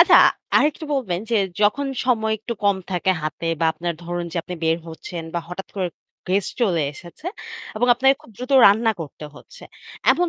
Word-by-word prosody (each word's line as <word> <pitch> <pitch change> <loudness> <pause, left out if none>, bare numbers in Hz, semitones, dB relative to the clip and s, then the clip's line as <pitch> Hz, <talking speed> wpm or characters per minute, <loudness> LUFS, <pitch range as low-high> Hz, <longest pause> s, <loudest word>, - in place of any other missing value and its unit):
আচ্ছা - - +8 0.4
আরেকটু 300 +1 +2
বলবেন 190 -11 -1
যে, - - +2 0.3
যখন 215 +7 +3 0.2
সময় 220 -3 +2
একটু 230 +3 -5
কম 200 -1 +4
থাকে 180 +1 +1
হাতে 155 +2 -4
বা - - +3
আপনার 170 +1 -3
ধরুন 175 0 -3
যে - - -5
আপনি 180 - -6
বের 160 0 +3
হচ্ছেন 165 +1 -7
বা 170 - 0
হঠাৎ 180 +2 -6
করে 185 -2 0 0.4
গেস্ট 190 +1 +1
চলে 175 -8 +2
এসেছে 175 - -12 0.5
এবং 240 +3 +2
আপনাকে 265 +3 +4
খুব - - -16
দ্রুত 250 +2 -5
রান্না 220 +3 +5
করতে 150 -1 -8
হচ্ছে। - - -14 0.5
এমন 355 0 +3
195 Hz, 180 wpm, -22 LUFS, 175-240 Hz, 0.5 s, আচ্ছা